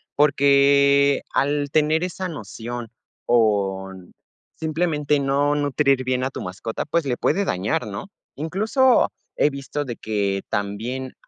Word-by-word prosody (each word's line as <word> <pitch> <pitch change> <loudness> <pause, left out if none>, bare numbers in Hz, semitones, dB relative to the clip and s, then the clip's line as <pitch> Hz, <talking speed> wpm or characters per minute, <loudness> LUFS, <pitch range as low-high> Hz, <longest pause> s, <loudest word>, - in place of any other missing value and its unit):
Porque, 140 0 +4
al 145 0 +1
tener 155 +2 +2
esa 185 +1 -3
noción 120 - -7 0.4
o 100 -5 +1
n 95 -2 -14 0.4
simplemente, 155 -2 0
no 140 +1 +1
nutrir 140 -2 +1
bien 130 0 -1
a - - -1
tu - - -7
mascota, 100 +5 -5
pues, 160 +1 0
le 130 -3 0
puede 200 +10 0
dañar, 100 - -1
¿no?, 100 - -6 0.3
incluso, 215 - +2 0.3
he 150 - +4
visto 140 +1 -4
de 120 -3 -6
que 100 -2 -1
también, 110 +6 -3
140 Hz, 135 wpm, -22 LUFS, 110-150 Hz, 0.4 s, Porque